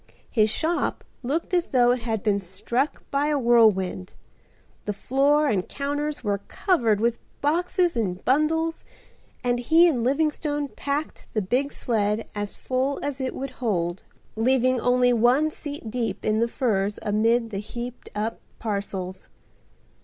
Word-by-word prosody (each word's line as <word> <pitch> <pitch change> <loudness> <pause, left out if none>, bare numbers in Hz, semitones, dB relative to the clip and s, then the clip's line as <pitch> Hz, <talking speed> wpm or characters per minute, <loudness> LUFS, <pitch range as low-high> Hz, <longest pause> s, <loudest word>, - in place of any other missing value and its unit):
His 215 -3 +3
shop 330 +9 0 0.2
looked 295 +9 -2
as 350 -1 +2
though 245 -2 +4
it 250 -1 0
had 225 -3 -2
been 205 -2 +2
struck 200 - -2
by 280 +1 +1
a 300 -1 +1
whirlwind. 215 -7 +3 0.7
The 210 - -1
floor 280 +8 +2
and 195 -8 0
counters 290 +1 -3
were 205 -2 0
covered 235 - +1
with 235 +1 +1 0.2
boxes 345 +3 +1
and 185 -5 -2
bundles, 320 +4 +1 0.6
and 245 0 +1
he 325 +8 +5
and 255 -9 +1
Livingstone 290 +1 0
packed 285 +3 -4
the 215 - +2
big 260 +9 0
sleigh 215 -2 0
as 205 -1 -4
full 265 +2 -1
as 280 -1 -3
it 260 - -2
would 270 0 -4
hold, 175 -6 -1 0.3
leaving 255 +2 +2
only 245 0 +3
one 250 +7 +3
seat 290 -7 -7
deep 235 -1 -3
in 215 0 +2
the 230 - +2
furs 210 -5 0
amid 225 +2 +2
the 195 - -3
heaped 240 +3 -7
up 215 +2 -2 0.2
parcels. 195 -3 -4
245 Hz, 145 wpm, -25 LUFS, 215-285 Hz, 0.7 s, he